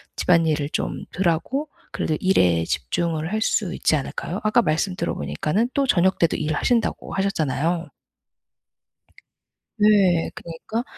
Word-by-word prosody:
집안일을 160 -4 +2
좀 - - -3
덜하고 195 - -1 0.2
그래도 155 - -1
일에 90 - +3
집중을 160 - -2
할 220 - 0
수 205 -4 0
있지 - - +1
않을까요? 160 +5 -4
아까 215 +3 +4
말씀 180 +2 0
들어 170 -2 -2
보니까는 210 +11 -1
또 275 -1 +1
저녁 190 -2 +3
때도 170 - +2
일하신다고 160 +10 -1
하셨잖아요. 170 -3 -1 1.9
네. 200 -5 +4
그러니까 170 +8 -5
175 Hz, 295 characters per minute, -23 LUFS, 155-205 Hz, 1.9 s, 아까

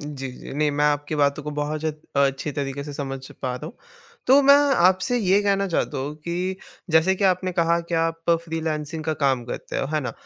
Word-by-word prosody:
जी, 140 -3 -6
जी। - - -10
नहीं, 150 0 +1
मैं 145 +1 0
आपकी 145 +1 0
बातों 145 +1 +1
को 150 - -5
बहुत 150 +1 -3
जद 155 -1 -3 0.2
अ, - - +4
अच्छी 135 +2 -3
तरीके 140 0 -4
से 145 - -7
समझ 135 -1 -5 0.2
पा 125 -1 -1
रहा 150 +5 -7
हूँ, 225 - -10 0.5
तो 275 +2 +7
मैं 280 +1 +8 0.2
आपसे 185 +8 +3
ये 200 -1 +3
कहना 200 -1 +1
चाहता 150 -4 -1
हूँ 145 +3 -4
कि, 180 +2 -2 0.3
जैसे 160 +4 +4
कि 200 - -1
आपने 185 0 +2
कहा 170 0 +2
कि 170 - -2
आप 165 0 0 0.2
फ्रीलांसिंग 160 -1 -3
का 160 - 0
काम 130 -3 +2
करते 120 - -6
हो, 135 - -1
है 155 - +2
ना? 125 -5 -4
155 Hz, 220 wpm, -23 LUFS, 145-175 Hz, 0.5 s, मैं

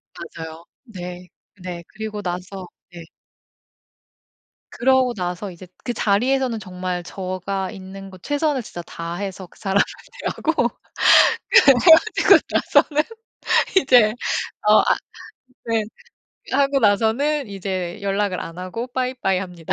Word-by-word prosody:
맞아요. 160 +1 -9 0.2
네. 180 -6 -9 0.3
네. 175 -1 -6
그리고 215 -1 -6
나서 180 +1 -5 0.2
네. 175 -1 -10 1.7
그러고 260 0 +2
나서 180 0 -4
이제 180 +1 -12 0.2
그 240 - -2
자리에서는 240 +3 +1
정말 180 -2 -5
제가 185 +1 -4
있는 195 0 -10
곳 185 -1 -15
최선을 290 -2 0
진짜 175 -5 -8
다해서 180 +3 -6
그 - - -23
사람을 200 0 +2 0.5
대하고 310 -7 0 1.0
헤어지고 320 +5 +6
나서는 300 0 +2 0.7
이제 245 - +5 0.5
어 215 - +7
아 - - +2 0.7
네. 225 -1 0 0.7
하고 275 +1 +3
나서는 235 +6 +1
이제 185 -3 -4
연락을 200 -1 -1
안 165 +1 -8
하고 185 +6 -5
bye 255 0 -2
bye 190 -1 +2
합니다. 175 -4 -5
195 Hz, 245 characters per minute, -21 LUFS, 180-245 Hz, 1.7 s, 어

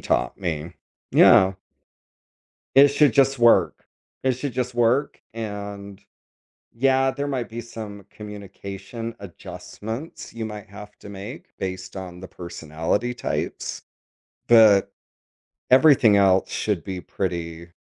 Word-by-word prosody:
taught 60 - -1
me. 85 -3 -4 0.4
Yeah. 95 0 +6 1.2
It 140 +1 +8
should 145 +1 +3
just 135 -1 +3
work. 120 -1 +4 0.4
It 130 - +2
should 130 +2 -4
just 125 0 -3
work, 120 +4 +1
and 100 -3 -7 0.7
yeah, 135 +2 +2
there 140 +2 -4
might 130 -4 -3
be 115 +1 -6
some 105 -4 -9
communication 105 +2 -8
adjustments 100 - -8
you 115 -1 -4
might 105 -2 -8
have 105 +1 -12
to - - -11
make 100 +6 -9
based 95 0 -5
on 90 -2 -7
the 95 - -9
personality 85 +6 -3
types, - - -4 0.6
but 110 -4 +6 0.8
everything 130 -6 +6
else 95 -1 +3
should 100 -6 -1
be 90 +1 -5
pretty 85 -2 -5
105 Hz, 120 wpm, -23 LUFS, 95-120 Hz, 1.2 s, It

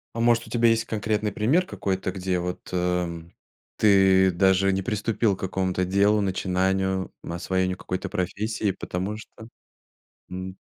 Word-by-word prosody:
А - - -3
может, 120 0 +3
у - - -13
тебя 120 -1 +3
есть 115 0 +2
конкретный 105 -1 -1
пример 130 - +2
какой-то, 95 - -2
где 90 -1 -2
вот, 90 +1 -5
э, 90 0 0 0.7
ты 95 -2 +5
даже 95 +2 +3
не 95 - 0
приступил 105 0 0
к - - -23
какому-то 95 -1 -1
делу, 100 +3 +3
начинанию, 95 0 0
м, - - -6
освоению 95 +1 -1
какой-то 95 +1 -4
профессии, 105 +3 -1
потому 95 +3 -4
что, 110 0 -12 0.8
м 95 +1 -6
95 Hz, 145 wpm, -25 LUFS, 95-105 Hz, 0.8 s, ты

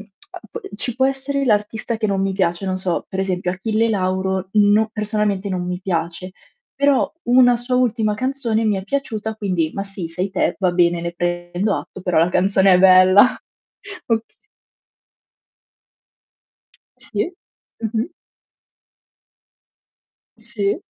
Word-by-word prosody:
uhm, 210 - -13 0.7
ci 245 +2 -3
può 265 0 +3
essere 275 +1 -2
l'artista 220 0 0
che 220 -1 -1
non 195 -1 0
mi 195 0 0
piace, 185 -1 -1
non 185 -1 -1
so, 180 -2 -2
per 190 0 -3
esempio 180 -2 -1
Achille 220 +5 0
Lauro 190 -1 -1
no 210 +1 +4
personalmente 210 -2 -1
non 180 -2 -3
mi 180 0 -3
piace, 175 0 -3 0.4
però 280 -1 +2
una 245 0 +5
sua 245 +1 -3
ultima 225 -4 +1
canzone 240 -2 -1
mi 210 -2 +1
è 190 - -5
piaciuta 220 -3 -3
quindi, 180 -7 -1
"Ma 195 - -3
sì 195 -4 -5
sei 180 +4 -3
te, 190 - 0
va 185 -2 +2
bene 175 -1 +2
ne 170 0 -3
prendo 175 +3 -1
atto, - - -8
però 180 -3 0
la 165 - +4
canzone 190 +1 +3
è - - +5
bella." 185 +1 +7 0.8
Oka 225 -2 0 2.7
Sì. 355 - -3 0.5
Mh-mh. 225 - -2 2.3
Sì 220 -3 -2
200 Hz, 135 wpm, -20 LUFS, 185-225 Hz, 2.7 s, bella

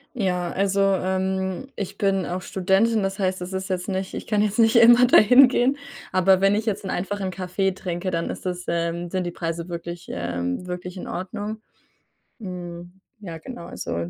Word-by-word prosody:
Ja, 180 -6 -1
also, 195 0 0
ähm, 190 +2 0
ich 195 - -5
bin 195 -2 +1
auch 180 +1 -4
Studentin, 195 +4 +2
das 195 0 -2
heißt, 185 -2 -1
das 180 +1 -5
ist 190 0 -3
jetzt 185 +1 -2
nicht 190 0 -3
ich - - -6
kann 210 -1 +2
jetzt 210 +1 -1
nicht 225 +1 +5
immer 240 +2 +8
da - - +7
hingehen. 250 +3 +6 0.4
Aber 185 0 +4
wenn 195 +1 +4
ich 215 +2 -1
jetzt 205 -2 -1
'n 190 - -3
einfachen 195 +1 -2
Kaffee 190 +1 -1
trinke, 185 0 -4
dann 170 -1 -2
ist - - -7
das 180 -1 -3
ähm, 170 +1 -2
sind 185 +1 -1
die 175 - -3
Preise 165 +1 -4
wirklich 170 0 -6
ähm, 85 - -3
wirklich 180 +1 -6
in - - -7
Ordnung. 205 +4 -5 0.8
Hm, 175 -1 -8 0.2
ja, 170 -5 -7
genau, 205 +1 -9
also 85 - -4
190 Hz, 185 wpm, -24 LUFS, 175-200 Hz, 0.8 s, immer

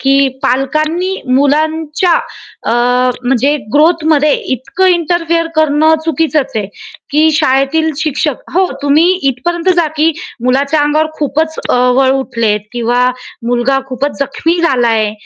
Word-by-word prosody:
की 275 +1 +3
पालकांनी 310 +8 0 0.2
मुलांच्या 310 +4 +1 0.6
अ, - - +1 0.5
म्हणजे 270 +4 +1 0.2
ग्रोथमध्ये 310 -1 +3 0.2
इतकं 260 +10 -1
इंटरफिअर 335 0 0
करणं 310 +1 +3
चुकीचंच 315 -3 0
आहे, 210 -3 -1 0.4
की 305 +2 +3
शाळेतील 300 +1 +1
शिक्षक 300 -2 -2
हो, 375 +1 +3 0.2
तुम्ही 290 +3 +3 0.3
इथपर्यंत 340 +8 -3
जा, 340 -2 +3
की 310 +2 +3 0.3
मुलाच्या 275 +4 +1
अंगावर 295 +2 +1
खूपच 315 +2 -1
अ, - - +2 0.2
वळ 265 0 +3
उठलेत 230 -6 0
किंवा 245 +1 +1 0.4
मुलगा 245 +3 +1
खूपच 270 +3 -3
जखमी 305 +5 -1
झाला 255 -8 +2
आहे 215 -2 +1
295 Hz, 120 wpm, -13 LUFS, 265-320 Hz, 0.6 s, की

